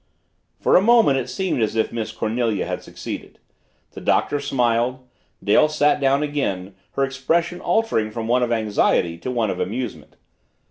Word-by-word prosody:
For - - +3
a - - +7
moment 220 - +5
it 125 - -5
seemed 190 -10 -1
as 110 0 0
if 110 - 0
Miss 115 -2 -3
Cornelia 110 -2 -1
had - - -4
succeeded. - - -8 0.5
The - - -10
Doctor 145 - +1
smiled; 125 0 0 0.4
Dale 105 +9 +4
sat 150 -1 +2
down 140 +1 +3
again, 100 -11 -2 0.2
her 135 - 0
expression 165 +6 -1
altering 175 - +1
from 110 +1 -5
one 125 +2 +2
of 120 -1 0
anxiety 105 -6 +1
to 105 - -5
one 115 -5 0
of - - -5
amusement. 125 -2 -4
125 Hz, 165 wpm, -22 LUFS, 110-145 Hz, 0.5 s, a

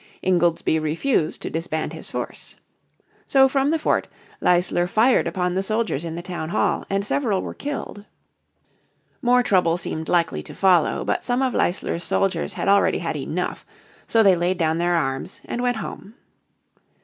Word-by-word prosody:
Ingoldsby 175 -3 +2
refused 155 - -1
to - - -4
disband 160 -1 -3
his - - -9
force. - - -6 0.7
So 270 -1 +5
from 270 +1 +1
the 325 - +2
fort 310 - 0 0.3
Leisler 175 0 +2
fired 230 +7 +3
upon 180 -2 -1
the 190 - 0
soldiers 215 -6 -1
in 165 -1 -5
the 170 - -6
town 175 -3 -5
hall, - - 0
and 195 0 0
several 210 -5 0
were - - -5
killed. 280 -7 -6 1.2
More 250 -1 +4
trouble 180 -6 +2
seemed 160 -2 -5
likely 170 -2 +1
to - - -11
follow, 185 -4 +3
but - - -1
some 250 +2 0
of 260 - 0
Leisler's 175 -1 -1
soldiers 185 +1 0
had - - -3
already 200 0 +4
had - - -3
enough, - - -3 0.4
so 225 -1 +4
they 195 -3 +6
laid 175 +2 0
down 160 -1 +1
their 175 0 +2
arms 135 -4 -2
and 240 - -3
went 245 -2 0
home. 215 0 -8
185 Hz, 165 wpm, -23 LUFS, 170-230 Hz, 1.2 s, they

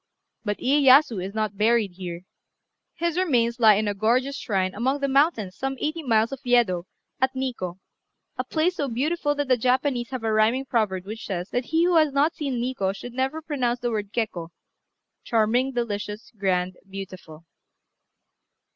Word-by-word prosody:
But 205 -2 -2
Iyéyasu 265 -6 +4
is 195 +3 -6
not 215 -2 -2
buried 220 -2 +3
here; 175 -1 -7 0.7
his 340 +1 -1
remains 240 -9 +1
lie 220 -3 +7
in 210 +1 0
a 205 - 0
gorgeous 245 +7 +1
shrine 190 -7 -1
among 260 +7 0
the 280 - 0
mountains 270 - +2
some 270 0 -3
eighty 310 +2 -2
miles 230 -4 +2
north 275 - -5
of - - -36
Yedo, 225 -8 +2 0.3
at 260 0 +1
Nikkô, 240 -10 -3 0.6
a - - -2
place 345 +3 0
so 285 - -1
beautiful 290 +5 0
that 290 -1 -2
the 255 -1 +3
Japanese 250 0 +1
have 255 -3 -5
a 220 -1 0
rhyming 225 +5 +2
proverb 205 -7 0
which 215 +3 -7
says, 180 -1 -4
that 245 0 -1
he 325 +4 +2
who 350 -1 +4
has 310 -2 +4
not 285 +4 +2
seen 280 -4 -3
Nikkô 235 -6 -1
should 245 +4 -8
never 265 +5 -2
pronounce 250 -6 -1
the 240 0 -1
word 205 -2 -3
Kekkô 215 -8 -3 0.7
(charming, 235 +4 +2
delicious, 210 -3 -4
grand, 185 -2 0
beautiful). 185 -5 -9
240 Hz, 175 wpm, -25 LUFS, 205-270 Hz, 0.7 s, lie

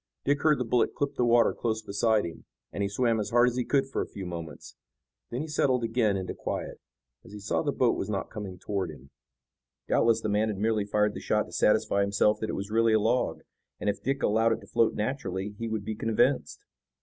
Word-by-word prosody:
Dick 145 0 +2
heard 155 -2 +4
the 125 - -2
bullet 120 +1 +1
clip 145 0 -1
the 125 - 0
water 120 -1 +4
close 110 -2 -2
beside 110 0 +1
him, 85 - -8 0.3
and - - -3
he 100 - 0
swam 115 +2 +1
as 105 -1 -2
hard 120 +2 +4
as 120 - -6
he 125 - 0
could 135 +2 +1
for 135 - -3
a - - -3
few 95 - -8
moments. 85 -3 -8 0.5
Then 120 +3 -3
he 155 - -4
settled 130 -5 +1
again 115 -3 +1
into 95 -1 -4
quiet, - - -5 0.4
as 110 - -14
he 105 - -7
saw 100 - -1
the - - 0
boat - - +2
was - - -4
not - - -3
coming 100 -3 -6
toward 95 -1 -3
him. 70 -3 -13 0.8
Doubtless 115 -1 +3
the - - -2
man 105 +1 +1
had 105 -2 -3
merely 110 0 +1
fired 105 0 +1
the - - -6
shot - - +1
to - - -15
satisfy 100 - +2
himself 100 +1 +2
that 110 - -3
it - - -2
was 100 +2 -5
really 115 0 +3
a 110 - +5
log, 120 +4 0 0.4
and 105 - +1
if 100 - -11
Dick 135 +1 -1
allowed 115 +2 +3
it 115 - -5
to - - -13
float 115 - +2
naturally 105 -4 -3
he 115 - -3
would 110 -2 -3
be 110 - -2
convinced. 110 0 0
110 Hz, 235 wpm, -28 LUFS, 100-120 Hz, 0.8 s, a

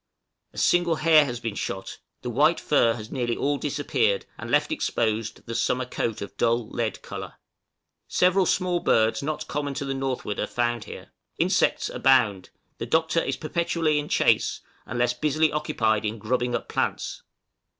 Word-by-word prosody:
A - - -18
single 175 -2 +3
hare 155 -1 +5
has 120 -3 -4
been 115 -3 -3
shot; 95 -1 -5 0.2
the 125 - -3
white 150 +7 +3
fur 120 -6 +3
has 110 -1 -9
nearly 120 -3 -1
all 145 0 0
disappeared, 150 - 0
and - - -8
left - - +2
exposed 110 - -1
the 115 - -5
summer 125 +2 0
coat 115 -3 -3
of 100 - -10
dull 115 -1 +1
lead 115 -4 -3
color. - - -7 0.7
Several 185 +1 +3
small 180 -2 +1
birds 110 -7 +2
not 150 +2 -3
common 145 -1 -3
to 140 - -3
the 135 - -2
northward 130 -6 -3
are - - -1
found 120 -2 -1
here. - - -10 0.3
Insects - - +2
abound; 105 -8 +2 0.3
the - - -4
Doctor 160 +1 +2
is - - -2
perpetually 165 -1 0
in 150 - -5
chase, - - +2 0.3
unless 120 +1 0
busily 155 +4 +1
occupied 110 -8 0
in 110 +1 -2
grubbing 120 +3 -1
up - - -4
plants. - - -2
130 Hz, 165 wpm, -25 LUFS, 115-155 Hz, 0.7 s, hare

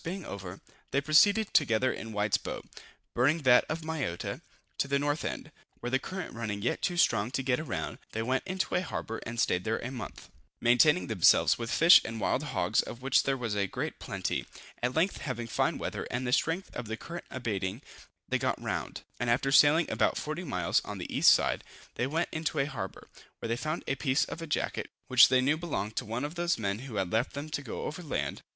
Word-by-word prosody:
being 180 +1 -5
over, 95 -1 -7 0.3
they 140 - +1
proceeded 200 +9 +4
together 115 +3 +3
in 115 - -7
White's 105 -1 +1
boat - - -6 0.5
(burning 145 +6 +2
that 125 -1 +6
of 160 +1 -2
Mayotta) 155 - -3 0.4
to - - +1
the 140 0 +2
north 145 +2 -1
end, - - -5 0.3
where 120 - -4
the 130 - +3
current 185 +4 -6
running 105 -3 -4
yet - - 0
too 180 -1 -1
strong 110 -8 +3
to 130 +1 -2
get 130 +3 0
round, 140 - -4
they 110 - -2
went 130 +2 0
into 185 0 -2
a 180 - +2
harbor 115 -9 -4
and 120 0 -5
staid 90 -4 +1
there 110 0 0
a 125 - -5
month, 125 -4 -8 0.3
maintaining 135 +8 +4
themselves 105 0 +4
with 115 -1 -4
fish 165 +7 +8
and 115 0 -5
wild - - +1
hogs, - - +1
of 120 +2 -9
which 135 0 +4
there 135 0 0
was 115 -4 -3
a 100 -1 +1
great - - -4
plenty. - - -3 0.3
At 125 +1 -1
length, 170 +5 +2
having 130 -4 -4
fine 115 - 0
weather, - - -4
and 120 +1 -2
the 125 - 0
strength 165 +7 0
of 120 - -5
the 110 +1 -4
current 170 +8 -8
abating, 110 -1 -3 0.4
they - - 0
got - - -1
round; - - -4 0.2
and 125 - -1
after 130 +3 +2
sailing 150 +3 +6
about - - +1
40 155 +4 -4
miles 90 - 0
on - - -6
the - - -6
east - - +7
side, - - +2 0.3
they 125 - -1
went 160 +5 -1
into 160 0 -2
a 140 - +2
harbor, 115 -10 -6 0.3
where - - -5
they 115 - +1
found 155 +6 -3
a - - 0
piece 135 0 +1
of 165 - -7
a 165 - -5
jacket, 150 - -2 0.2
which 130 0 +8
they 130 0 +3
knew 145 +4 +2
belonged 110 - -3
to - - -1
one 115 +5 -3
of 150 - -5
those 175 0 0
men 100 -1 -2
who 130 -3 -8
had 95 -3 -1
left 115 +3 +1
them 145 +2 -5
to 145 - -3
go 130 - -6
over 160 +4 -5
land. 155 - -3
130 Hz, 220 wpm, -30 LUFS, 115-155 Hz, 0.5 s, fish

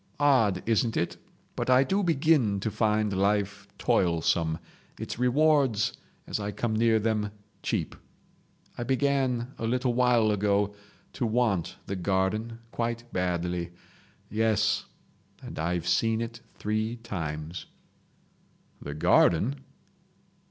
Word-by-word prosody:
Odd, 115 -10 +3
isn't 115 0 +1
it? 85 0 -1 0.4
But - - -2
I 130 +1 +6
do 195 +8 0
begin 150 - +2
to 110 - -1
find 105 -2 +1
life 100 +1 0
toilsome, 85 -2 +1 0.4
its - - -5
rewards, 135 -3 +3 0.3
as - - -3
I 105 0 -3
come 110 +1 -2
near 115 0 +4
them, 110 -1 0 0.3
cheap. - - -2 0.8
I 120 - -4
began 130 -1 0
a 115 - -1
little 125 +1 +1
while 120 -3 +3
ago 100 0 +1 0.4
to 125 - -1
want 110 -6 0
the 100 - -3
garden 95 +5 -1
quite 115 0 -2
badly. 90 -1 -1 0.5
Yes—and 110 -4 -2
I've 85 +1 -1
seen 110 +5 +2
it 115 0 -5
three 110 +2 -1
times." 80 -7 -5 1.1
"The 70 0 -6
garden?" 95 - +3
110 Hz, 115 wpm, -28 LUFS, 95-120 Hz, 1.1 s, I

